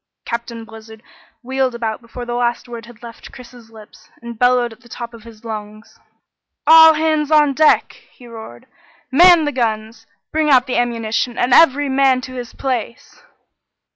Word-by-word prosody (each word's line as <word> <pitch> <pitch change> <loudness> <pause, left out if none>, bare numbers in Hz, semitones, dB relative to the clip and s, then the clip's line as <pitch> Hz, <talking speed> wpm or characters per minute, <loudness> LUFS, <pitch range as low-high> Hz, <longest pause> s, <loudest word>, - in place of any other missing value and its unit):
Captain 235 -1 -6
Blizzard 220 0 -14 0.4
wheeled 260 0 -2
about 225 -2 -4
before 240 +1 -9
the 240 - -5
last 240 0 -2
word 235 -1 -10
had 240 -1 -17
left 230 -1 -12
Chris's 245 -3 -15
lips, 220 -2 -17
and 235 -1 -10
bellowed 245 -1 +2
at 225 - -21
the 240 - -20
top 235 0 -8
of 230 - -13
his 230 0 -15
lungs. 215 0 -9 0.7
"All 320 +1 +8
hands 310 -1 0
on 300 -2 +3
deck!" 310 +2 +2 0.2
he 245 - -18
roared. 220 - -12 0.5
"Man 340 +2 +6
the 290 - -1
guns! 225 -2 -4 0.2
Bring 310 -1 0
out 255 -3 +4
the 255 - -3
ammunition, 235 0 -2
and 245 0 0
every 290 -1 +4
man 265 -1 +2
to 255 0 -9
his 245 -1 -7
place!" 250 - -6
240 Hz, 170 wpm, -17 LUFS, 230-265 Hz, 0.7 s, All